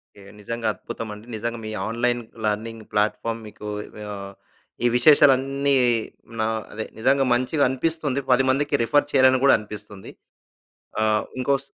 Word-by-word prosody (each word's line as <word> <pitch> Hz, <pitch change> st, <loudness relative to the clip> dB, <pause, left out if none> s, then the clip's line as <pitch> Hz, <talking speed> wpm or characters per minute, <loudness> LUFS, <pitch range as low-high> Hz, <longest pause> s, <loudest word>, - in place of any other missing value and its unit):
Okay. 100 Hz, -, -15 dB, 0.2 s
నిజంగా 115 Hz, +2 st, -3 dB
అద్భుతమండి. 105 Hz, -1 st, -8 dB
నిజంగా 115 Hz, +2 st, -3 dB
మీ 110 Hz, -, -5 dB, 0.2 s
ఆన్‌లైన్ 120 Hz, +1 st, 0 dB, 0.2 s
లెర్నింగ్ 110 Hz, +1 st, -2 dB
ప్లాట్‌ఫామ్ 115 Hz, +2 st, 0 dB
మీకు 105 Hz, 0 st, -10 dB, 0.5 s
ఆహ్, 100 Hz, -1 st, -7 dB, 0.5 s
ఈ -, -, +6 dB
విశేషాలన్నీ 140 Hz, 0 st, +4 dB, 0.7 s
నా 110 Hz, -, +2 dB, 0.3 s
అదే 110 Hz, +1 st, -4 dB
నిజంగా 135 Hz, +3 st, +3 dB
మంచిగా 130 Hz, +4 st, +1 dB
అనిపిస్తుంది. 145 Hz, 0 st, -1 dB
10 125 Hz, +1 st, +5 dB
మందికి 145 Hz, +2 st, +1 dB
రిఫర్ 145 Hz, +4 st, +2 dB
చేయాలని 130 Hz, -1 st, +5 dB
గూడా 140 Hz, -, +7 dB
అనిపిస్తుంది. 105 Hz, -2 st, -10 dB, 0.9 s
ఆ! -, -, +2 dB, 0.4 s
ఇంకోస్ 140 Hz, +1 st, 0 dB
120 Hz, 125 wpm, -23 LUFS, 110-140 Hz, 0.9 s, గూడా